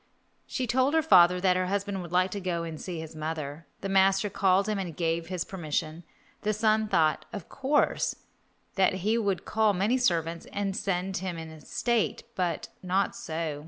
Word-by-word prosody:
She 260 - -2
told 260 +5 +2
her 320 - +4
father 180 - +6
that 185 -1 +3
her 185 0 0
husband 200 0 -2
would 170 -2 -8
like 185 +1 +2
to 200 - -3
go 175 -2 -2
and 160 -2 -6
see 175 -3 -5
his 160 0 -8
mother. 155 0 -5
The 195 - -3
master 195 +1 +3
called 195 0 +3
him 210 -2 -1
and 175 -5 -5
gave 165 -1 -1
his 180 -1 -3
permission. 160 -2 -3 0.4
The 215 +1 0
son 215 0 +2
thought, 160 -7 +2
of 200 -5 -7
course, 280 +2 +1 0.6
that 190 0 +4
he 220 +2 +3
would 200 -4 -1
call 220 -1 +2
many 205 +7 +1
servants 170 -7 0
and 200 -1 -2
send 190 -1 -1
him 185 -1 -4
in 160 -1 -9
state, 235 +7 -1
but 180 -6 -2
not 190 +2 0
so. 160 -2 -4
185 Hz, 185 wpm, -28 LUFS, 165-205 Hz, 0.6 s, father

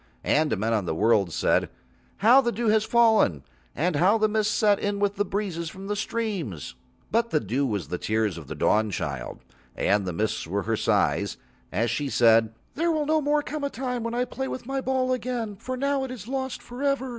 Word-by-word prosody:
And 150 -7 +2
men 110 +4 0
on 105 -4 0
the 80 - -2
world 105 -2 +3
said: - - +1 0.5
"How 240 +6 +6
the 240 -2 0
dew 230 0 0
has 215 0 +3
fallen, 220 - +3 0.3
and 165 +1 0
how 190 +8 +4
the 215 0 +3
mists 215 0 +1
set 205 -3 +3
in 205 0 -1
with 200 0 0
breezes 180 -5 -2
from 190 +4 -10
the 205 +1 -2
streams." 200 - -3 0.4
But 230 +1 +2
the 155 - +2
dew 130 +6 -1
was 100 - -3
the 90 - -3
tears 110 -3 0
of 80 -5 -9
the - - -6
Dawnchild, 90 - -1 0.3
and 100 -1 +1
the - - -1
mists 105 -1 -2
were 100 +4 -2
her 115 0 0
sighs - - +1 0.3
when 115 +2 0
she 140 +5 -1
said: 115 -3 +4 0.2
"There 335 +3 +1
will 310 -2 0
no 310 +1 +2
more 295 +1 +1
come 300 0 -5
a 280 - 0
time 250 -1 -3
when 230 +1 -3
I 250 +1 +1
play 265 +1 -4
with 255 - -6
my 270 +1 -2
ball 260 -1 0
again, 240 -4 -3
for 255 +5 -5
now 280 +1 0
it 265 - -4
is 235 -5 -8
lost 265 0 -3
for 245 +2 -9
ever." 275 -2 0
205 Hz, 215 wpm, -26 LUFS, -, 0.5 s, How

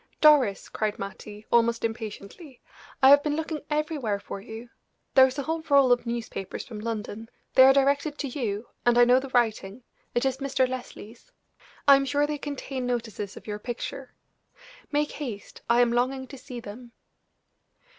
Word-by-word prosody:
"Doris," 285 -10 +4
cried 215 -1 -2
Mattie, 205 +1 -8
almost 235 0 +3
impatiently, 225 - -7 0.4
"I 265 - +9
have 285 0 +8
been 295 0 -1
looking 315 -1 -3
everywhere 300 -9 -1
for 200 -1 -8
you. 225 +2 -9 0.5
There 265 0 +8
is 260 +1 -7
a 280 - -2
whole 320 +2 -2
roll 275 -3 +5
of 245 -1 +2
newspapers 230 -5 -5
from 220 -3 -8
London; 225 0 -5 0.2
they 260 - +8
are 265 - +8
directed 280 +2 +1
to 285 - -3
you, 235 -5 -4 0.2
and 240 0 +3
I 245 - +7
know 250 +1 +5
the 270 0 -7
writing 225 -2 0 0.3
it 240 - +1
is 265 -1 0
Mr. 270 -2 +1
Leslie's. 250 - -9 0.6
I 280 -1 +9
am 275 - -1
sure 285 +2 +1
they 295 0 -4
contain 270 -3 -5
notices 225 -5 -4
of - - -12
your 210 -1 -5
picture. 250 +3 -6 0.8
Make 295 0 0
haste 240 -9 -7
I 235 +1 +5
am 240 -1 +3
longing 260 +2 0
to 280 - -9
see 255 -2 -8
them." 235 +2 -11
245 Hz, 175 wpm, -26 LUFS, 225-275 Hz, 0.8 s, I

